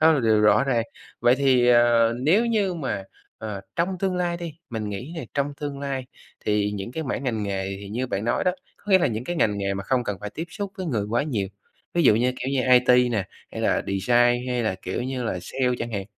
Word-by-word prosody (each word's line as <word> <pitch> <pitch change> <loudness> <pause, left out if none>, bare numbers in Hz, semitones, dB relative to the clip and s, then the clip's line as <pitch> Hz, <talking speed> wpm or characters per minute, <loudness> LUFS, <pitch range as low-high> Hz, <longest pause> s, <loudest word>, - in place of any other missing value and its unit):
Đó 160 +1 +6
là 145 - +2
điều 110 -2 +3
rõ 105 +4 +5
ràng. 120 -4 +1 0.4
Vậy 120 +1 +5
thì, 130 -3 +4
ờ, 120 -1 +5
nếu 200 - +4
như 205 -5 +1
mà, 135 - -3 0.4
ờ, 105 -3 -5 0.2
trong 180 +2 0
tương 190 -1 0
lai 175 -1 0
đi, 170 -3 -6 0.2
mình 110 -2 -3
nghĩ 120 +10 -6
nè, 160 - -4
trong 140 0 -1
tương 145 -1 -4
lai 135 -2 -3 0.4
thì 105 -1 +1
những 100 +4 -5
cái 160 - -3
mảng 135 -1 -3
ngành 110 -4 -1
nghề 95 -1 -3
thì 100 - -8
như 120 +5 -2
bạn 100 -2 -3
nói 120 - 0
đó, 180 - +3 0.2
có 205 - -9
nghĩa 190 - +8
là 175 - +2
những 115 +1 -3
cái 175 +3 -3
ngành 105 -9 +2
nghề 100 0 -1
mà 100 - -4
không 125 0 +1
cần 105 -2 -2
phải 105 0 -5
tiếp 165 - -5
xúc 200 0 -5
với 185 -3 -4
người 110 -9 -1
quá 120 +4 +2
nhiều, 110 -10 -2 0.5
ví 170 - +3
dụ 125 - +6
như 125 +3 +2
kiểu 130 - -3
như 135 - +2
IT 125 0 +5 0.2
nè, 100 -4 0 0.3
hay - - -5
là - - +1
design 120 +5 +2
hay 125 -1 0
là 110 -4 0
kiểu 95 - -3
như 130 0 -3
là 95 - -2
sale 125 +4 0
chẳng 115 0 -4
hạn, 100 -2 -2
125 Hz, 250 wpm, -24 LUFS, 105-145 Hz, 0.5 s, nghĩa